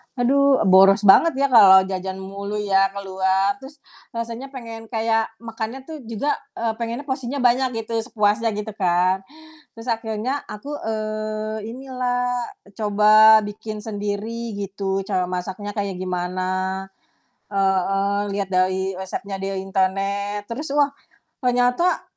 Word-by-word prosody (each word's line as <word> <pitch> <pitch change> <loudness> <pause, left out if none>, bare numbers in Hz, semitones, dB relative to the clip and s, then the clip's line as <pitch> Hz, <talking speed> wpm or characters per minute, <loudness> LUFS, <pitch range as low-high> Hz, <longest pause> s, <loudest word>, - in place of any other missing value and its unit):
aduh, 270 +2 +3
boros 195 +1 +6
banget 300 +11 +6
ya 280 +1 +2
kalau 190 -5 +8
jajan 190 0 -4
mulu 200 +2 -6
ya 195 -2 +3
keluar, 190 0 +1
terus 275 +2 -13 0.3
rasanya 230 +3 -4
pengen 230 -4 -9
kayak 225 -1 0 0.2
makannya 230 +3 -5
tuh 320 -2 -7
juga, 230 +6 -1 0.2
eee, 230 -1 -1
pengennya 235 +3 -3
porsinya 265 0 -3
banyak 245 -2 +2
gitu, 230 0 -2
sepuasnya 215 0 +1
gitu 210 +1 -4
kan. 185 -1 +2 0.6
Terus 225 +1 -10
akhirnya 225 +4 -2
aku, 210 +8 -8 0.2
eee, 215 0 -3
inilah, 245 -1 -2 0.3
coba 215 +1 +6
bikin 210 +1 -7
sendiri 215 +2 -4
gitu, 195 -1 -3
cara 185 -2 -1
masaknya 190 +3 -5
kayak 200 -3 -3
gimana. 185 +1 -2 0.6
Heeh. 195 +1 +1
Lihat 200 -1 -2
dari 185 +1 +1
resepnya 190 +1 -5
dari 195 0 -3
internet. 195 +2 -1
Terus, 275 +5 -5
wah, 290 -1 +5 0.5
ternyata, 250 +7 +2
210 Hz, 125 wpm, -22 LUFS, 195-235 Hz, 0.6 s, kalau